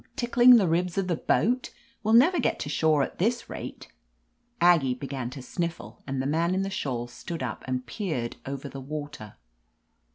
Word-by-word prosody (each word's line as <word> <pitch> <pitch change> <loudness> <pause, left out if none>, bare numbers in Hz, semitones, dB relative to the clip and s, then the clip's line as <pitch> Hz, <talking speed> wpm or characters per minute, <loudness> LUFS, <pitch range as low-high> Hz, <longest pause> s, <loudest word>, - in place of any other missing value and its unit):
Tickling 245 0 +6
the 205 -6 +4
ribs 175 +2 0
of 195 -2 0
the 175 - +1
boat? 250 +9 +1 0.3
We'll 220 +1 +3
never 325 +9 +6
get - - +1
to 145 - -4
shore 155 -1 +3
at - - -6
this 230 +5 0
rate - - -7 0.4
!" - - -46 0.3
Aggie 160 -8 +4
began 130 -2 -5
to 130 0 -9
sniffle, 170 +5 -5
and 135 -1 -2
the 130 - -1
man 165 +5 +1
in 190 - 0
the 195 - -3
shawl 125 -9 -2
stood 165 +7 -7
up - - -5
and 130 0 -2
peered 125 - -3
over 140 +1 -5
the 135 -1 -8
water. 145 -6 -7
160 Hz, 190 wpm, -27 LUFS, 135-195 Hz, 0.4 s, Tickling